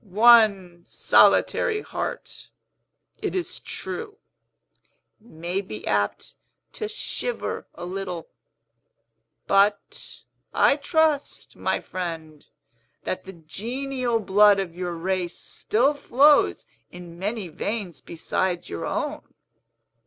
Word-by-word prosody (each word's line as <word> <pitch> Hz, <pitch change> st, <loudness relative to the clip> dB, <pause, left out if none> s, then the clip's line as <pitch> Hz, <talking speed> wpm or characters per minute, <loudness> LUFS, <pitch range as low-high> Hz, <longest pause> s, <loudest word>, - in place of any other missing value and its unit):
One 205 Hz, -4 st, +4 dB
solitary 430 Hz, -3 st, +3 dB
heart, -, -, -6 dB, 0.7 s
it -, -, -2 dB
is 365 Hz, -2 st, -3 dB
true, 425 Hz, -3 st, -6 dB, 1.0 s
may 180 Hz, -3 st, -4 dB
be 110 Hz, -, -9 dB
apt 100 Hz, -1 st, -1 dB, 0.4 s
to 430 Hz, -, -5 dB
shiver 455 Hz, +3 st, -4 dB
a 175 Hz, -, -7 dB
little. 180 Hz, -2 st, -5 dB, 1.2 s
But, 200 Hz, +1 st, 0 dB, 0.3 s
I -, -, +5 dB
trust, 305 Hz, 0 st, 0 dB
my -, -, -1 dB
friend, 165 Hz, -4 st, -6 dB, 0.6 s
that 185 Hz, -, -4 dB
the 190 Hz, -, -9 dB
genial 240 Hz, -, -3 dB
blood 205 Hz, 0 st, +5 dB
of 175 Hz, -4 st, -4 dB
your 180 Hz, -1 st, -3 dB
race 180 Hz, +1 st, -2 dB
still 255 Hz, +7 st, 0 dB
flows 285 Hz, +1 st, +4 dB, 0.3 s
in 175 Hz, -1 st, -11 dB
many 205 Hz, 0 st, -3 dB
veins 180 Hz, -, -4 dB
besides 175 Hz, +2 st, -2 dB
your 85 Hz, -, -4 dB
own?" -, -, -2 dB
195 Hz, 100 wpm, -24 LUFS, 175-240 Hz, 1.2 s, I